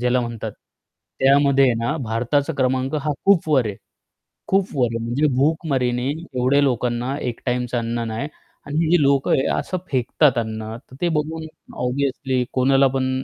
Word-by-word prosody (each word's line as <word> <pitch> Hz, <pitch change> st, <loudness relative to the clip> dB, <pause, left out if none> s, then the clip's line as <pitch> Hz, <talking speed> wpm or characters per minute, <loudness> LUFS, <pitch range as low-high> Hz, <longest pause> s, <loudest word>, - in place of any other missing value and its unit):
ज्याला 125 Hz, +1 st, +2 dB
म्हणतात 115 Hz, -2 st, -5 dB, 0.7 s
त्यामध्ये 135 Hz, -1 st, +4 dB
ना 140 Hz, +7 st, -1 dB
भारताचा 125 Hz, +7 st, 0 dB
क्रमांक 130 Hz, +1 st, 0 dB
हा 150 Hz, 0 st, -1 dB
खूप 195 Hz, -5 st, +4 dB
वर 135 Hz, -6 st, +3 dB
आहे. 100 Hz, -2 st, -4 dB, 0.7 s
खूप 195 Hz, 0 st, +2 dB
वर 120 Hz, -4 st, +1 dB
म्हणजे 120 Hz, +6 st, +1 dB
भूकमारीने 135 Hz, -4 st, +1 dB
एवढ्या 140 Hz, -4 st, 0 dB
लोकांना 125 Hz, 0 st, 0 dB
एक 120 Hz, -2 st, -3 dB
टाईमचं 125 Hz, 0 st, -1 dB
अन्न 115 Hz, 0 st, -2 dB
नाही 110 Hz, +6 st, -3 dB, 0.4 s
आणि 145 Hz, -, -6 dB
ही -, -, -1 dB
जी 175 Hz, -3 st, +5 dB
लोकं 140 Hz, -1 st, +2 dB
आहे 130 Hz, -, +3 dB
असं 185 Hz, -, -3 dB
फेकतात 130 Hz, +1 st, +2 dB
अन्न, 110 Hz, -1 st, -3 dB
तर 130 Hz, +1 st, -17 dB
ते 175 Hz, -, +2 dB
बघून 160 Hz, +1 st, -2 dB, 0.4 s
ऑब्वियसली 130 Hz, 0 st, -1 dB
कोणाला 135 Hz, +1 st, +4 dB
पण 130 Hz, 0 st, -1 dB
130 Hz, 155 wpm, -21 LUFS, 120-145 Hz, 0.7 s, जी